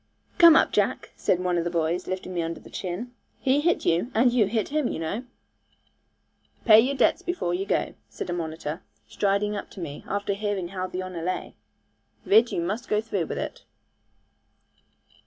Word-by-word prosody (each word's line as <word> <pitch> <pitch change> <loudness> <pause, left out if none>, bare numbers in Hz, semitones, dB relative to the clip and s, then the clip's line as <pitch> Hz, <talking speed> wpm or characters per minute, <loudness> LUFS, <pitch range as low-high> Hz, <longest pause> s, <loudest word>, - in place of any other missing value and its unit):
'Come 335 -2 +9
up, - - +4
Jack,' - - 0
said 180 - +1
one 180 -1 +1
of - - -1
the 175 - -1
boys, 170 +1 -1
lifting 185 0 -4
me 175 - -1
under 165 0 -4
the - - -15
chin; 195 +7 -5 0.3
'he 270 +2 +2
hit 340 +3 +1
you, 170 +9 +2
and 240 +2 +4
you 225 -5 +4
hit 220 0 -1
him, 300 -2 0
you - - -3
know.' 180 +10 -3 1.4
'Pay 220 -2 +9
your 265 +5 +2
debts 320 - +3
before 350 - -2
you 190 +3 -2
go,' - - 0 0.2
said 110 - -6
a 175 - -2
monitor, 160 0 -4 0.3
striding 200 - 0
up 200 - -6
to - - -12
me, 150 -5 -6
after 200 0 -1
hearing 200 -3 -2
how 185 -1 -3
the 185 0 -4
honour 185 -2 -6
lay; 185 +2 -3 0.7
'Ridd, 225 +3 +5
you - - -1
must 210 +8 -3
go 210 - +2
through 205 -7 -2
with - - -4
it.' - - -5
195 Hz, 190 wpm, -26 LUFS, 175-225 Hz, 1.4 s, Come